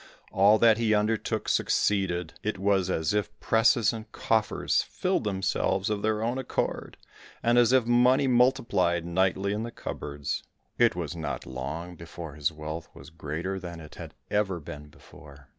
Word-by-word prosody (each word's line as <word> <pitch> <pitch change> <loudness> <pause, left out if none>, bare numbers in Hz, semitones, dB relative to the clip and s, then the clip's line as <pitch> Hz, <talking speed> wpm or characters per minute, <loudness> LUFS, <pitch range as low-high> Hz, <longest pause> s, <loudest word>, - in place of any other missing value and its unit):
All 100 +3 +5
that 115 0 +5
he 110 -2 +3
undertook 105 +1 -1
succeeded, 90 -5 +1
it 105 -1 -2
was 95 -1 +1
as 80 0 0
if 105 -1 -2
presses 115 0 +3
and 110 -1 -8
coffers 110 -1 +1
filled - - -2
themselves 95 0 0
of 105 -1 -1
their 110 0 0
own 120 +3 -1
accord, 130 - -3 0.5
and 120 +1 +3
as 120 0 +4
if 130 -3 +4
money 125 +3 +4
multiplied 120 -9 +2
nightly 95 +3 +1
in 105 - -2
the 115 - -4
cupboards. 70 -10 -5 0.4
It - - +4
was - - -4
not 75 -6 -4
long 70 +7 -6
before 85 -1 -9
his 75 +1 -1
wealth 80 +1 -7
was - - -13
greater 85 +4 -4
than 85 -2 -8
it 75 -2 -12
had - - -10 0.2
ever 100 -4 0
been 75 -1 -9
before. 70 -2 -16
95 Hz, 160 wpm, -27 LUFS, 80-110 Hz, 0.5 s, All